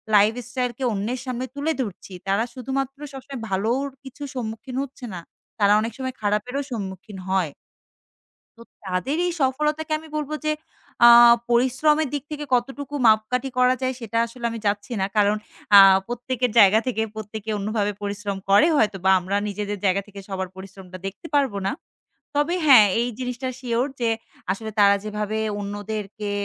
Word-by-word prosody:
Life 210 Hz, +2 st, +5 dB, 0.2 s
স্টাইলকে 250 Hz, 0 st, -3 dB
অন্যের 220 Hz, +6 st, -2 dB
সামনে 255 Hz, 0 st, -3 dB
তুলে 290 Hz, +3 st, -1 dB
ধরছি। 200 Hz, -3 st, -7 dB
তারা 200 Hz, +4 st, +2 dB
শুধুমাত্র 270 Hz, +1 st, -3 dB, 0.2 s
সবসময় 270 Hz, -1 st, -8 dB
ভালোর 225 Hz, +8 st, 0 dB, 0.2 s
কিছুর 275 Hz, +1 st, -8 dB
সম্মুখীন 225 Hz, +1 st, -5 dB
হচ্ছে 265 Hz, -2 st, -9 dB
না, 175 Hz, -, -5 dB, 0.4 s
তারা 205 Hz, 0 st, +5 dB
অনেক 225 Hz, -, -3 dB
সময় 260 Hz, -1 st, -4 dB
খারাপেরও 210 Hz, +7 st, -1 dB
সম্মুখীন 195 Hz, -2 st, -6 dB
হয়। 185 Hz, -6 st, +1 dB, 1.1 s
তো 230 Hz, -, -12 dB, 0.2 s
তাদেরই 275 Hz, -, -1 dB
সফলতাকে 300 Hz, +4 st, 0 dB
আমি 320 Hz, -, -13 dB
বলব, 300 Hz, 0 st, -3 dB
যে, 305 Hz, -, +2 dB, 0.5 s
আ -, -, +11 dB, 0.4 s
পরিশ্রমের 260 Hz, +5 st, +3 dB
দিক 285 Hz, -2 st, -2 dB
থেকে 295 Hz, 0 st, -4 dB
কতটুকু 270 Hz, +4 st, -1 dB
মাপকাঠি 230 Hz, +5 st, +2 dB
করা 250 Hz, 0 st, +5 dB
যায়, 260 Hz, 0 st, 0 dB
সেটা 230 Hz, 0 st, -4 dB
আসলে 235 Hz, +1 st, -8 dB
আমি 230 Hz, -, -5 dB
যাচ্ছি 205 Hz, +4 st, -1 dB
না। -, -, +2 dB
কারণ 205 Hz, 0 st, +4 dB, 0.4 s
আ -, -, +12 dB, 0.3 s
প্রত্যেকের 245 Hz, 0 st, -2 dB
জায়গা 205 Hz, +2 st, +7 dB
থেকে 225 Hz, -3 st, 0 dB
প্রত্যেকে 215 Hz, 0 st, -7 dB
অন্যভাবে 205 Hz, 0 st, -1 dB
পরিশ্রম 200 Hz, -1 st, -3 dB
করে 205 Hz, +11 st, +6 dB
হয়তোবা 195 Hz, -5 st, +2 dB
আমরা 185 Hz, +3 st, -3 dB
নিজেদের 205 Hz, 0 st, -3 dB
জায়গা 195 Hz, +1 st, +2 dB
থেকে 200 Hz, -1 st, -11 dB
সবার 190 Hz, -1 st, -3 dB
পরিশ্রমটা 190 Hz, -1 st, -10 dB
দেখতে 200 Hz, -, -8 dB
পারবো 265 Hz, -8 st, +2 dB
না। -, -, +1 dB, 0.7 s
তবে 295 Hz, +5 st, +2 dB
হ্যাঁ, 250 Hz, -7 st, +9 dB
এই 240 Hz, -, 0 dB
জিনিসটা 250 Hz, 0 st, -3 dB
শিওর 245 Hz, 0 st, 0 dB
যে, 230 Hz, -1 st, +2 dB, 0.4 s
আসলে, 220 Hz, +3 st, -6 dB
তারা 200 Hz, 0 st, +6 dB
যেভাবে 210 Hz, 0 st, -3 dB, 0.2 s
অন্যদেরকে 205 Hz, 0 st, -5 dB
230 Hz, 155 wpm, -23 LUFS, 205-260 Hz, 1.1 s, আ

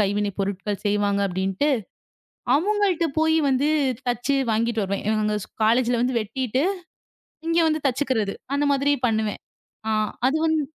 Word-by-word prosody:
கைவினை 205 Hz, 0 st, +1 dB
பொருட்கள் 200 Hz, +1 st, -3 dB
செய்வாங்க 205 Hz, -1 st, +1 dB
அப்படின்னுட்டு. 190 Hz, +9 st, 0 dB, 0.9 s
அவங்கள்ட்ட 380 Hz, 0 st, +1 dB
போயி 320 Hz, 0 st, +3 dB
வந்து 270 Hz, +2 st, +2 dB, 0.4 s
தச்சு 245 Hz, +3 st, 0 dB, 0.2 s
வாங்கிட்டு 225 Hz, 0 st, 0 dB
வருவேன். 195 Hz, 0 st, -3 dB
எங்க 210 Hz, -1 st, +1 dB
ஸ் -, -, -27 dB
காலேஜ்ல 235 Hz, +2 st, +3 dB
வந்து 250 Hz, 0 st, +1 dB
வெட்டிட்டு, 255 Hz, +4 st, -1 dB, 0.8 s
இங்க 330 Hz, +1 st, +3 dB
வந்து 310 Hz, -1 st, 0 dB
தச்சுக்கறது 255 Hz, -6 st, 0 dB, 0.2 s
அந்த 285 Hz, -, +1 dB
மாதிரி 280 Hz, +1 st, +2 dB
பண்ணுவேன். 220 Hz, -2 st, -1 dB, 0.5 s
அ -, -, +1 dB, 0.4 s
அது 280 Hz, +4 st, +1 dB
வந்து 315 Hz, -1 st, +2 dB
235 Hz, 135 wpm, -24 LUFS, 205-285 Hz, 0.9 s, போயி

